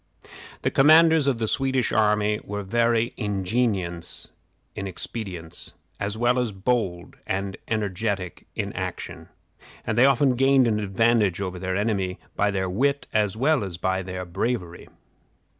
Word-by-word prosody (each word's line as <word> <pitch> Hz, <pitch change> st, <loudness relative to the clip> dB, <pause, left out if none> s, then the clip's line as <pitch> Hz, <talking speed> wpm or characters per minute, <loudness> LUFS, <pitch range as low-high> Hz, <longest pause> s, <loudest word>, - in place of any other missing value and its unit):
The -, -, +1 dB
commanders 160 Hz, +1 st, +6 dB
of 135 Hz, -4 st, +2 dB
the 115 Hz, -1 st, -1 dB
Swedish 130 Hz, 0 st, +1 dB
army 105 Hz, 0 st, +2 dB
were 105 Hz, 0 st, -5 dB
very 115 Hz, +3 st, +1 dB
ingenious 100 Hz, -4 st, -2 dB, 0.5 s
in 100 Hz, -, -4 dB
expedients, 90 Hz, -3 st, -6 dB, 0.2 s
as 100 Hz, +1 st, -2 dB
well 120 Hz, +2 st, +2 dB
as 120 Hz, -3 st, 0 dB
bold 95 Hz, -4 st, -2 dB
and 95 Hz, 0 st, -2 dB
energetic 100 Hz, -3 st, -2 dB
in -, -, -3 dB
action, -, -, -6 dB, 0.6 s
and 110 Hz, -, -1 dB
they 130 Hz, -, +7 dB
often 135 Hz, -1 st, +3 dB
gained 135 Hz, 0 st, +4 dB
an 105 Hz, -2 st, +1 dB
advantage 105 Hz, -1 st, +2 dB
over 90 Hz, -2 st, -4 dB
their 95 Hz, 0 st, -2 dB
enemy 100 Hz, -3 st, -1 dB, 0.2 s
by 105 Hz, -, +2 dB
their 95 Hz, -2 st, -1 dB
wit 140 Hz, +10 st, 0 dB
as 105 Hz, -1 st, +1 dB
well 140 Hz, 0 st, +2 dB
as 90 Hz, -4 st, -5 dB
by 95 Hz, +1 st, 0 dB
their 90 Hz, 0 st, -5 dB
bravery. 90 Hz, -1 st, -3 dB
105 Hz, 140 wpm, -25 LUFS, 95-120 Hz, 0.6 s, they